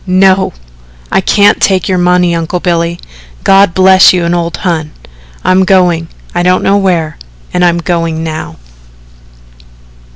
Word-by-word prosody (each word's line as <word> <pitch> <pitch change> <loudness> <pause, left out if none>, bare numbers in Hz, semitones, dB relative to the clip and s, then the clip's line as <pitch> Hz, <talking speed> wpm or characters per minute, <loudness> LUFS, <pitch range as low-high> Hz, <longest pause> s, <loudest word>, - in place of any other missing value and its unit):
"No, 190 +1 +2 0.6
I - - +2
can't 205 +2 +2
take 190 -2 +1
your 185 -2 0
money, 180 0 +1
Uncle 170 +1 -3
Billy 170 -1 -2 0.4
God 195 -3 +3
bless 190 0 +5
you 175 -2 -1
and 170 - -1
old 170 -1 -3
Hon 160 -4 -3 0.5
I'm 185 +1 +2
going 180 -3 +1 0.3
I 175 - -1
don't 180 +1 +1
know 200 - +2
where 170 -6 -2 0.3
and 180 - 0
I'm 175 -1 +2
going 165 -2 -2
now." 155 - -6
180 Hz, 140 wpm, -10 LUFS, 170-185 Hz, 0.6 s, bless